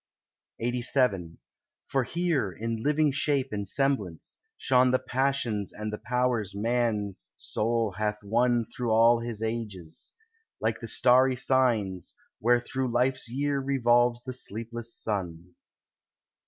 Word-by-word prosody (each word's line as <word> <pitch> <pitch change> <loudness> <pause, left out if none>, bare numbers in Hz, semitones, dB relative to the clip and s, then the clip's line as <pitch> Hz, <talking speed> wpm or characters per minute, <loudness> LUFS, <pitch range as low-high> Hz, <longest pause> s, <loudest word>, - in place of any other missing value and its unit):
LXXXVII 120 -7 0 0.5
For 135 -1 0
here, 165 - 0
in 115 +4 -4
living 150 +2 +2
shape 140 -1 0
and 100 -1 -3
semblance, 105 - -1 0.2
shone 130 -1 +3
The 130 - +4
passions 125 -7 -1
and 105 0 -5
the 105 - -4
powers 120 -4 0
man's 110 -3 -1
soul 115 -1 0
hath 105 0 -1
won 120 +2 +2
Through 120 0 -2
all 115 +1 +5
his 115 -2 -5
ages, 105 -8 -6 0.4
like 110 0 -1
the 115 - -6
starry 130 +2 +4
signs 120 -8 +1 0.2
Where 120 +2 +4
through 130 +1 -3
life's 125 0 +1
year 140 +3 0
revolves 120 -3 +2
the 130 - -5
sleepless 115 -1 -5
sun. 90 -6 -4
120 Hz, 125 wpm, -28 LUFS, 105-130 Hz, 0.5 s, all